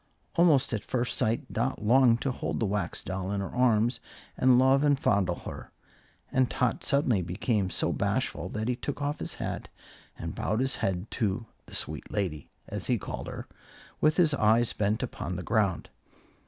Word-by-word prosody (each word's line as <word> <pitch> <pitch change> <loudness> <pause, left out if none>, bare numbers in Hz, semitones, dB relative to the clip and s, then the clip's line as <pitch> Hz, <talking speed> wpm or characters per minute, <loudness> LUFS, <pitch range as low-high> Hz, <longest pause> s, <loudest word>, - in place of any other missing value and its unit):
Almost 155 -7 +4
at 105 -2 -2
first 125 -1 -1
sight 110 +2 -1
Dot 120 0 -1
longed 120 +1 +5
to 135 - 0
hold - - -3
the 115 - +1
Wax 105 0 -2
Doll 95 0 -3
in 100 - -1
her 100 - -4
arms 120 -1 +3 0.4
and 125 -1 +5
love 135 +2 +5
and 145 -2 +3
fondle 95 -7 +2
her, - - -8 0.6
and 130 -1 +2
Tot 125 - 0
suddenly 135 -8 +2
became 95 +3 -1
so - - -1
bashful 85 +4 -1
that 110 +3 -3
he 125 - +1
took 145 +4 -5
off 145 +1 -2
his - - -4
hat - - -4 0.5
and - - -5
bowed 110 - -1
his 135 +1 +2
head 95 +2 -2
to 110 -1 -1 0.2
the - - -9
"sweet - - -3
lady" 90 -8 -2 0.2
(as - - -4
he - - +2
called - - -6
her), - - -7 0.5
with 155 +1 +3
his 165 -5 +4
eyes 115 -2 +3
bent 105 +3 0
upon 90 -7 -4
the 90 - -4
ground. 100 -5 +1
115 Hz, 180 wpm, -28 LUFS, 100-130 Hz, 0.6 s, longed